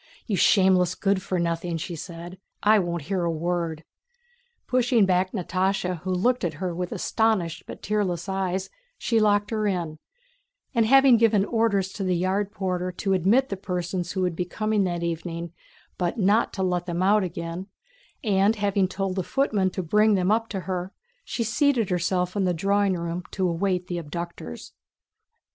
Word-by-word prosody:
"You 210 - -1
shameless 185 -2 +4
good 195 0 +1
for 185 - -2
nothing!" 170 0 -1
said 170 0 -7
she. 185 - -15 0.2
"I 215 +1 +6
won't 170 -4 -2
hear 180 +3 -1
a 170 - +1
word." 165 -1 -2 0.8
Pushing 245 -4 +3
back 185 0 +1
Natásha 185 -1 -1
who 185 +4 -4
looked 240 +8 +1
at 165 -4 -1
her 180 +2 -3
with 180 +1 -4
astonished 215 -8 0
but - - -9
tearless 190 -5 -1
eyes, 190 -1 -2 0.3
she 230 - +1
locked 205 0 +2
her 215 -1 0
in; 170 -5 -2 0.7
and 230 -3 +3
having 270 -1 +7
given 220 -3 +3
orders 215 -5 +1
to 200 - -4
the 185 -1 +1
yard 190 +3 0
porter 185 -3 -2
to 195 +2 -1
admit 205 +9 +3
the 195 - -3
persons 180 -1 -3
who 190 - -1
would 180 -2 0
be 180 - -1
coming 215 +2 0
that 175 -1 -2
evening, 170 0 -4 0.5
but 175 +4 -1
not 210 +2 +3
to 190 - -2
let 180 -1 -1
them 175 +1 -1
out 205 +2 +4
again, 170 +1 -5 0.6
and 205 0 +3
having 200 -2 +1
told 190 0 -3
the 190 - -1
footman 210 -6 +1
to 185 0 -4
bring 210 +5 +4
them 185 +1 +1
up 225 +1 +1
to 195 -3 -3
her, 185 0 -4 0.3
she 235 - -3
seated 230 - +1
herself 180 +1 0
in 200 - +1
the 180 -1 +1
drawing 200 +3 +2
room 170 0 -3
to 190 -1 -1
await 180 +1 0
the 175 -1 -3
abductors. 170 - -7
185 Hz, 175 wpm, -25 LUFS, 175-205 Hz, 0.8 s, having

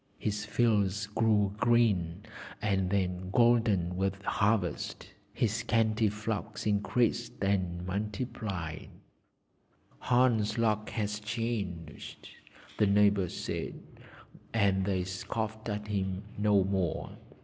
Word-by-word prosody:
His 105 0 -2
fields 105 -2 +2
grew 105 -1 +2
green, 105 -6 +2 0.4
and 95 -3 +1
then 90 -1 -1
golden 115 -7 +3
with 95 +1 -1
harvest; 100 -3 0 0.2
his 110 -3 0
scanty 110 -1 +2
flocks 105 +1 -4
increased 115 +3 +1
and 90 -3 0
multiplied. 100 -4 -4 1.1
'Hans' 120 -3 +2
luck 110 -2 +1
has 105 -1 -2
changed!' 105 -8 -4 0.5
the 105 - +5
neighbours 100 -2 +3
said, - - -4 0.8
and 100 -3 +3
they 95 -2 0
scoffed 110 +4 -4
at 105 0 -3
him 95 -2 -2
no 105 -2 +3
more. 95 -3 -1
105 Hz, 100 wpm, -30 LUFS, 95-110 Hz, 1.1 s, the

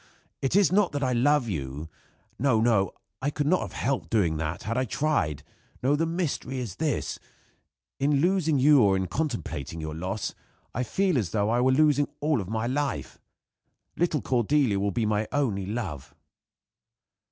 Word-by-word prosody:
It 135 +5 0
is 200 -2 +5
not 195 -3 +3
that 145 -1 -1
I 130 -1 +1
love 135 +2 +3
you. 75 -4 -4 0.5
No, 125 -3 +3
no. 110 -5 +3 0.3
I 140 - +1
could 145 0 -2
not 180 +5 +3
have - - -6
helped 135 -2 -1
doing 90 -9 +2
that 80 +2 -3
had 115 +2 -2
I 130 - +1
tried. 110 - 0 0.4
No; 140 +3 +3
the 165 +2 0
mystery 165 -6 -2
is 120 -7 -5
this. 155 -2 -1 0.8
In 140 +2 +2
losing 170 -2 +2
you 140 +1 +6
or 100 -3 +4
in 95 - -1
contemplating 90 - -3
your 80 -1 -4
loss, 95 +6 -3 0.4
I 125 - -1
feel 180 - +1
as 100 -7 -2
though 105 +3 0
I 120 +1 +2
were 130 +1 +4
losing 145 +1 +4
my - - -33
all 150 -5 +1
of 95 - -7
life. 125 +6 -2 0.8
Little 165 -4 +1
Cordelia 125 -3 +2
will 100 +1 +1
be 110 +3 -1
my 105 0 0
only 105 -10 0
love." 95 - -5
125 Hz, 175 wpm, -27 LUFS, 100-145 Hz, 0.8 s, you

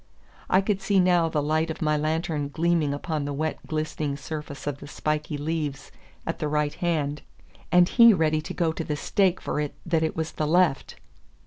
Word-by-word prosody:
I 190 - +5
could 195 -1 -1
see 195 -1 +2
now 175 -2 +3
the 150 -2 0
light 155 +2 +1
of 160 - -5
my 150 -1 +1
lantern 155 -1 -1
gleaming 165 -1 +1
upon 150 +1 -3
the 145 - -3
wet 155 +2 -2
glistening 155 -2 -2
surface 145 -1 -7
of 145 -1 -3
the 145 - -10
spiky 150 +1 -2
leaves 150 -2 -3 0.3
at - - -3
the 150 - -1
right 150 0 0
hand, 150 -4 -1 0.5
and 175 0 +6
he 235 +2 +7
ready 155 -5 +2
to - - -6
go 170 -3 +1
to 165 - -4
the 150 - -2
stake 185 +4 +1
for - - -3
it 150 -1 -3
that 165 -2 +1
it 160 - -1
was 160 0 -2
the 155 - -2
left! 175 -3 +2
155 Hz, 200 wpm, -26 LUFS, 150-170 Hz, 0.5 s, he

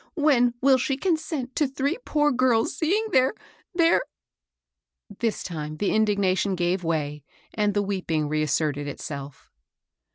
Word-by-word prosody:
"When 255 -6 +3
will 265 -1 +5
she 270 +1 -1
consent 315 -6 -2
to 300 - +3
three 280 - -2
poor 295 -6 +2
girls 250 -2 +2
seeing 380 +9 +1
their 260 +8 +3 0.2
— - - -35
their 335 -1 +4 0.4
" - - -64
— 205 - -20
This 230 -2 -1
time 155 -3 -5
the 200 - 0
indignation 200 -3 +1
gave 180 +1 0
way, 150 -3 -2 0.3
and 210 -2 0
the 205 - +2
weeping 180 -6 -1
reasserted 150 -1 0
itself. 140 -1 -7
210 Hz, 150 wpm, -25 LUFS, -, 0.4 s, will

